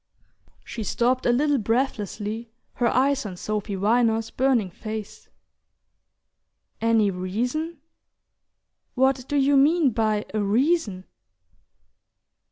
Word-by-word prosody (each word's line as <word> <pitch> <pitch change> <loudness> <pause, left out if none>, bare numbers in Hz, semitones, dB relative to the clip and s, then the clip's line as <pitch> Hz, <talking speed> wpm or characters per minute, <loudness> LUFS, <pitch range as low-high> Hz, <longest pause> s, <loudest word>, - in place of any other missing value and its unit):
She 230 - -6
stopped 250 +5 0
a - - +5
little 285 +3 +2
breathlessly, 225 -1 -2 0.2
her 240 - 0
eyes 270 +3 +2
on 190 -4 -7
Sophy 210 +1 -3
Viner's 225 +2 +1
burning 250 -8 +1
face. 215 +2 -7 1.5
"Any 225 -3 +3
reason? 245 - -3 1.2
What 265 0 +2
do 290 - -2
you 280 0 +3
mean 295 +1 +4
by 215 -2 0
a 215 - 0
reason?" 215 - +1
230 Hz, 100 wpm, -24 LUFS, 210-270 Hz, 1.5 s, a